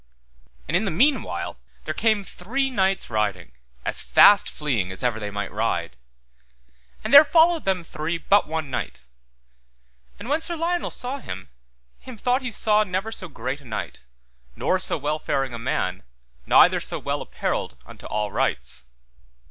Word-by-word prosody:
And 165 - -1
in 195 +5 +2
the - - 0
meanwhile 190 - 0 0.3
there 155 - -2
came 215 +2 +1
three 260 +10 -2
knights 195 -4 +1
riding, 105 - -1 0.3
as - - -2
fast 205 -1 +6
fleeing 120 -12 -2
as 95 - -6
ever 120 -3 0
they 105 -1 -4
might 100 0 -4
ride. 90 - -2 1.1
And - - -3
there 285 +2 +12
followed 325 +1 +3
them 190 -2 0
three 165 +1 -3
but 200 +3 +3
one 155 -3 -4
knight. 125 - -4 1.2
And - - -9
when 295 +4 +1
Sir 340 +1 -3
Lionel 340 +2 -1
saw 260 +3 -2
him, 95 - -8 0.5
him 255 -3 -11
thought 250 +5 +1
he 255 - -3
saw 215 0 +2
never 195 +2 -3
so 190 -4 -5
great 135 -1 -5
a - - -18
knight, 115 -3 -5 0.6
nor - - +1
so - - -1
well 150 +1 -2
faring 135 -3 -1
a 115 - -5
man, 95 -6 -2 0.5
neither - - +6
so - - -4
well - - -3
apparelled 65 - -3
unto - - -12
all 105 -1 -2
rights. - - -2
165 Hz, 165 wpm, -24 LUFS, -, 1.2 s, there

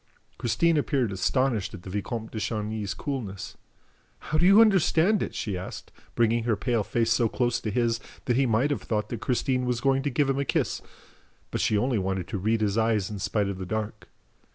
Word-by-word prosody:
Christine 160 +7 +2
appeared 135 -6 +1
astonished 110 +2 0
at 90 - -12
the - - -8
Vicomte 110 +3 -4
de 110 - -4
Chagny's 105 -2 -3
coolness: 115 -10 -5 0.6
"How 155 - -2
do 175 - +5
you 195 +3 +8
understand 195 -2 +4
it?" - - -3
she 105 -4 -2
asked, 90 +1 -7 0.2
bringing 115 0 +2
her 115 -3 +2
pale 115 +1 0
face 115 +2 0
so 115 -1 +3
close 120 +1 0
to 110 - -3
his 115 +1 +1 0.3
that 120 - +1
he 135 +1 +3
might 120 +6 +2
have 145 - -1
thought 105 -2 -2
that 120 -2 -5
Christine 125 0 0
was 125 -1 0
going 135 +1 +2
to 145 - -1
give 140 +2 +1
him 135 0 0
a - - +1
kiss; - - -1 0.7
but - - -1
she 105 - +2
only 120 +1 +1
wanted 95 -1 -2
to 100 - -3
read 110 +3 +1
his 105 +1 +1
eyes 110 -3 +1
in 105 - -5
spite 100 +1 0
of 100 -1 -4
the 95 - -4
dark. 110 +1 -4
115 Hz, 210 wpm, -27 LUFS, 105-135 Hz, 0.7 s, you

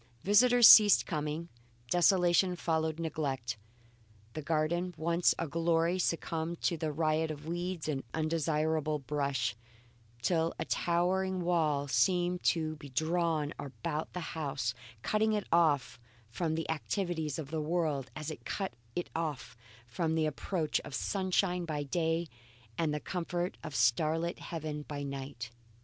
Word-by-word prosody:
Visitors 240 +4 +7
ceased 210 -2 +9
coming; 155 +1 -3 0.4
desolation 180 +1 +4
followed 160 -2 -1
neglect. 135 -8 -2 0.8
The 155 - -4
garden, 165 +4 0
once 170 +2 +2
a 165 - -2
glory, 165 +3 +1
succumbed 165 -1 -1
to 170 - +1
a 155 -1 0
riot 155 +1 +1
of 150 -1 -6
weeds 175 0 -3
and 140 -3 -2
undesirable 155 -1 0
brush, 140 -5 -1 0.7
till 165 +2 +1
a - - -3
towering 185 +2 0
wall 155 -5 +1
seemed 175 +9 +2
to 155 -2 +1
be 145 -2 -10
drawn 160 +1 0
about 140 +3 -4
the 180 - -3
house 140 -8 -2 0.3
cutting 215 +1 +2
it 210 -2 -1
off 155 -7 +2 0.3
from 160 +4 -1
the 160 - -3
activities 160 -2 -2
of 150 -3 -6
the 160 -1 -1
world 150 -5 -1
as 155 0 -4
it 155 - -9
cut 195 -2 -3 0.2
it 175 - -3
off 155 -7 -3 0.3
from 160 +7 -1
the 160 -1 +2
approach 155 +2 -1
of 135 - -7
sunshine 185 -2 0
by 155 -3 -3
day, 165 +3 0 0.5
and 155 +4 0
the 150 - -1
comfort 175 +1 -3
of 155 -3 -6
a - - -2
star 120 +9 +3
lit 170 +1 -3
heaven 155 -2 -5
by 145 -1 -6
night. 135 -4 -6
160 Hz, 145 wpm, -32 LUFS, 150-175 Hz, 0.8 s, ceased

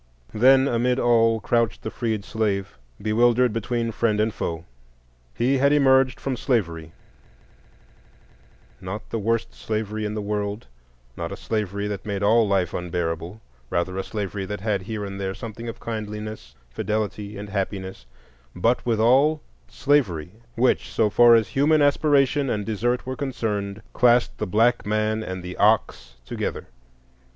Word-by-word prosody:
Then 130 +4 +5
amid 125 0 +1
all 115 -2 +3
crouched 115 0 0
the - - -4
freed 110 -5 -2
slave, 100 -7 -2 0.2
bewildered 120 +2 +3
between 115 +1 -2
friend 110 -1 0
and 110 0 +1
foe. 80 0 -4 0.7
He 130 +2 +1
had 140 +1 +4
emerged 135 -3 +4
from 135 -1 -2
slavery,—not 85 - -1 2.2
the 115 - -1
worst 115 +2 -1
slavery 110 0 -3
in 105 0 -3
the - - -2
world, 105 +1 -3 0.5
not - - -5
a - - -6
slavery 100 -2 -3
that 100 -2 -4
made 100 -1 -3
all 110 +2 +4
life 95 -3 +1
unbearable, 85 +2 -3 0.3
rather 85 +2 -1
a 95 - -2
slavery 100 -1 -4
that 105 -1 -5
had 100 -2 0
here 105 +1 -5
and 100 0 -6
there 95 0 -3
something 115 +2 -7
of 115 - -8
kindliness, 105 - -6 0.2
fidelity, 105 +3 -3
and 100 0 -7
happiness,—but 90 - -4
withal 125 +7 +3 0.3
slavery, 100 - 0 0.2
which, 125 +2 +1
so 105 -2 +1
far 120 +1 +7
as 115 -2 +2
human 150 +3 +3
aspiration 145 -1 +3
and 105 -3 -1
desert 120 +3 -1
were 130 0 -4
concerned, 110 -7 -3
classed 120 0 +3
the 105 - -2
black 115 +6 +2
man 110 +1 0
and 95 -4 -5
the 90 0 -6
ox 105 - +1
together. - - -4
110 Hz, 145 wpm, -24 LUFS, 100-120 Hz, 2.2 s, far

